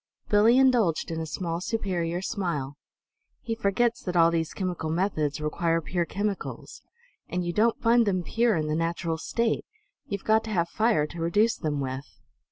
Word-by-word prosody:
Billie 215 Hz, +4 st, +5 dB
indulged 240 Hz, -13 st, +3 dB
in 165 Hz, -, -3 dB
a 160 Hz, -, -4 dB
small, 170 Hz, +1 st, -3 dB
superior 180 Hz, -4 st, -2 dB
smile. 150 Hz, -10 st, -2 dB, 0.6 s
"He 230 Hz, -, -4 dB
forgets 225 Hz, +2 st, +1 dB
that 180 Hz, -2 st, -4 dB
all 165 Hz, -1 st, +5 dB
these 165 Hz, -1 st, -1 dB
chemical 180 Hz, -4 st, -3 dB
methods 160 Hz, -4 st, 0 dB
require 165 Hz, +2 st, 0 dB
pure 170 Hz, +2 st, -2 dB
chemicals. 200 Hz, +2 st, -4 dB, 0.5 s
And 180 Hz, 0 st, -2 dB
you 175 Hz, -, -2 dB
don't 225 Hz, +3 st, +2 dB
find 230 Hz, -1 st, +4 dB
them 185 Hz, -3 st, +1 dB
pure 230 Hz, +3 st, +2 dB
in 155 Hz, -2 st, 0 dB
the 155 Hz, -, -1 dB
natural 165 Hz, 0 st, -1 dB
state. 230 Hz, +6 st, 0 dB, 0.4 s
You've 200 Hz, -1 st, -4 dB
got 220 Hz, 0 st, +3 dB
to -, -, -6 dB
have 170 Hz, -5 st, 0 dB
fire 215 Hz, -9 st, +2 dB
to 165 Hz, +2 st, -8 dB
reduce 205 Hz, +7 st, +2 dB
them 150 Hz, -2 st, -2 dB
with." 130 Hz, +1 st, -4 dB
175 Hz, 175 wpm, -27 LUFS, 165-215 Hz, 0.6 s, Billie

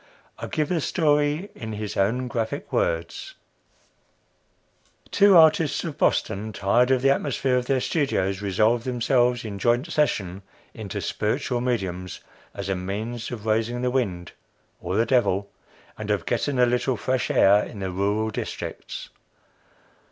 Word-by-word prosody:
I -, -, -5 dB
give 155 Hz, -2 st, -1 dB
the 170 Hz, -3 st, 0 dB
story 150 Hz, +3 st, +1 dB
in 110 Hz, -1 st, -7 dB
his 105 Hz, -1 st, -5 dB
own 115 Hz, +6 st, +1 dB
graphic 120 Hz, +4 st, -4 dB
words: -, -, -2 dB, 1.8 s
"Two 200 Hz, -2 st, +6 dB
artists 160 Hz, -2 st, +4 dB
of 160 Hz, -4 st, -6 dB
Boston, 105 Hz, +2 st, 0 dB
tired 120 Hz, +7 st, +2 dB
of 130 Hz, -1 st, +2 dB
the 135 Hz, -, +5 dB
atmosphere 135 Hz, -2 st, 0 dB
of 125 Hz, -1 st, 0 dB
their 135 Hz, -1 st, +2 dB
studios, 100 Hz, -, 0 dB
resolved 110 Hz, +4 st, +2 dB
themselves, 125 Hz, -1 st, +1 dB
in 100 Hz, -2 st, -6 dB
joint 120 Hz, -, +1 dB
session, 100 Hz, -, 0 dB, 0.3 s
into -, -, -5 dB
spiritual 120 Hz, -1 st, -1 dB
mediums, 95 Hz, -8 st, -3 dB, 0.4 s
as 100 Hz, -1 st, -5 dB
a 95 Hz, -, 0 dB
means 110 Hz, +6 st, -4 dB
of 110 Hz, -4 st, -7 dB
raising 115 Hz, +3 st, 0 dB
the 125 Hz, -, +1 dB
wind 95 Hz, -10 st, -2 dB, 0.5 s
or 90 Hz, +2 st, -3 dB
the 115 Hz, -, +3 dB
devil 100 Hz, -6 st, +1 dB, 0.5 s
and -, -, -5 dB
of -, -, 0 dB
getting 140 Hz, -2 st, -1 dB
a 125 Hz, -, +5 dB
little 125 Hz, +1 st, 0 dB
fresh 130 Hz, +2 st, -1 dB
air 100 Hz, +2 st, +5 dB
in -, -, -9 dB
the 95 Hz, -1 st, -3 dB
rural 100 Hz, +4 st, 0 dB
districts. -, -, -6 dB
120 Hz, 145 wpm, -24 LUFS, 100-135 Hz, 1.8 s, Two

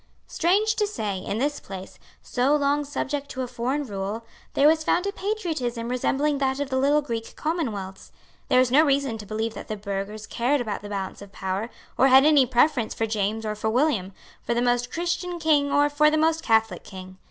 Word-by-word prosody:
Strange 405 Hz, +6 st, +2 dB
to 420 Hz, -, +1 dB
say, 210 Hz, -, -3 dB
in 200 Hz, +2 st, -4 dB
this 290 Hz, +4 st, -1 dB
place, 190 Hz, -1 st, -9 dB, 0.2 s
so 265 Hz, +4 st, +1 dB
long 290 Hz, 0 st, +1 dB
subject 285 Hz, 0 st, -3 dB
to 260 Hz, -, -4 dB
a -, -, -4 dB
foreign 255 Hz, +5 st, -2 dB
rule, 205 Hz, +1 st, -4 dB, 0.3 s
there 285 Hz, -, +5 dB
was 315 Hz, 0 st, +3 dB
found 355 Hz, +4 st, +1 dB
a 400 Hz, -, 0 dB
patriotism 320 Hz, -, -3 dB
resembling 275 Hz, +3 st, 0 dB
that 265 Hz, 0 st, 0 dB
of 285 Hz, -1 st, -3 dB
the -, -, 0 dB
little 290 Hz, +2 st, +3 dB
Greek 230 Hz, -4 st, -5 dB
commonwealths. 220 Hz, -, -4 dB, 0.4 s
There 255 Hz, -, +4 dB
is 255 Hz, -1 st, +3 dB
no 295 Hz, +4 st, +6 dB
reason 275 Hz, -6 st, +1 dB
to 210 Hz, -, -9 dB
believe 220 Hz, +1 st, -2 dB
that -, -, -9 dB
the 215 Hz, -, -4 dB
burghers 200 Hz, +1 st, -5 dB
cared 250 Hz, +6 st, 0 dB
about 220 Hz, -4 st, -3 dB
the 205 Hz, -, -8 dB
balance 195 Hz, -2 st, -5 dB
of 200 Hz, -1 st, -11 dB
power, 190 Hz, +4 st, -3 dB, 0.3 s
or 265 Hz, -, +6 dB
had 265 Hz, +1 st, +7 dB
any 295 Hz, -4 st, +5 dB
preference 245 Hz, -1 st, +2 dB
for 225 Hz, -, 0 dB
James 215 Hz, 0 st, -1 dB
or 215 Hz, -, -1 dB
for 215 Hz, +1 st, -2 dB
William, 230 Hz, -6 st, +1 dB, 0.3 s
for 235 Hz, -, -2 dB
the -, -, +1 dB
Most 245 Hz, 0 st, +1 dB
Christian 345 Hz, +1 st, -2 dB
King 295 Hz, -3 st, +2 dB
or 290 Hz, +1 st, +4 dB
for 300 Hz, +1 st, +4 dB
the 310 Hz, -, +1 dB
Most 320 Hz, +1 st, +2 dB
Catholic 225 Hz, -, +1 dB
King. 185 Hz, -1 st, -11 dB
255 Hz, 210 wpm, -25 LUFS, 215-295 Hz, 0.4 s, had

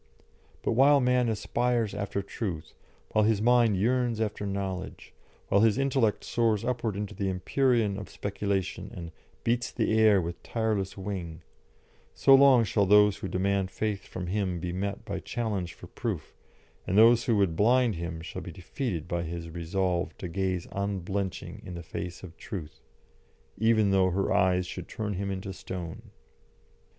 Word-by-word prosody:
But -, -, +1 dB
while 140 Hz, +4 st, +6 dB
man 125 Hz, -2 st, +2 dB
aspires 115 Hz, 0 st, 0 dB
after 100 Hz, -1 st, -3 dB
truth, 95 Hz, -6 st, -5 dB, 0.4 s
while 110 Hz, -, +3 dB
his 110 Hz, -1 st, +3 dB
mind 120 Hz, -2 st, +4 dB
yearns 120 Hz, +2 st, +1 dB
after 105 Hz, -2 st, -2 dB
knowledge, 95 Hz, -1 st, -5 dB, 0.4 s
while 100 Hz, -, +4 dB
his 110 Hz, 0 st, +4 dB
intellect 135 Hz, -5 st, +1 dB
soars 115 Hz, -2 st, +1 dB
upward 115 Hz, -4 st, -1 dB
into 105 Hz, 0 st, -4 dB
the 100 Hz, -2 st, -2 dB
empyrean 105 Hz, +2 st, +1 dB
of 105 Hz, -, -8 dB
speculation 100 Hz, -1 st, -3 dB
and 85 Hz, -3 st, -7 dB, 0.3 s
"beats 120 Hz, 0 st, 0 dB
the 110 Hz, -, 0 dB
air 110 Hz, -3 st, +6 dB
with 85 Hz, 0 st, -4 dB
tireless 110 Hz, -5 st, -2 dB
wing," 95 Hz, -5 st, -5 dB, 0.7 s
so 135 Hz, -, +5 dB
long 135 Hz, -3 st, +7 dB
shall 105 Hz, -2 st, +1 dB
those 105 Hz, 0 st, +6 dB
who -, -, -5 dB
demand 95 Hz, 0 st, 0 dB
faith 105 Hz, +1 st, -3 dB
from 90 Hz, -, -5 dB
him 95 Hz, -1 st, -1 dB
be 85 Hz, +1 st, -4 dB
met 100 Hz, +2 st, -3 dB
by 100 Hz, -2 st, -3 dB
challenge 100 Hz, -6 st, -3 dB
for -, -, -12 dB
proof, -, -, -5 dB, 0.5 s
and 95 Hz, -, +1 dB
those 115 Hz, +2 st, +6 dB
who 115 Hz, -3 st, +2 dB
would 95 Hz, -5 st, +2 dB
blind 120 Hz, +4 st, +3 dB
him 85 Hz, -1 st, -5 dB
shall 85 Hz, +3 st, -6 dB
be 90 Hz, -, -7 dB
defeated 90 Hz, -, -4 dB
by 85 Hz, 0 st, -1 dB
his 85 Hz, 0 st, -5 dB
resolve 90 Hz, +2 st, -1 dB
to 90 Hz, -, -5 dB
gaze 95 Hz, 0 st, -2 dB
unblenching 100 Hz, -1 st, -3 dB
on 90 Hz, -, -6 dB
the 85 Hz, -, -7 dB
face 85 Hz, +3 st, -6 dB
of 85 Hz, -3 st, -10 dB
Truth, 85 Hz, -9 st, -7 dB, 0.8 s
even 110 Hz, -2 st, +3 dB
though 95 Hz, -1 st, +4 dB
her 95 Hz, +2 st, 0 dB
eyes 90 Hz, -2 st, +3 dB
should 90 Hz, -, -7 dB
turn 105 Hz, -2 st, -4 dB
him 100 Hz, +1 st, -3 dB
into 95 Hz, 0 st, -4 dB
stone. 90 Hz, -2 st, -7 dB
100 Hz, 160 wpm, -28 LUFS, 90-110 Hz, 0.8 s, long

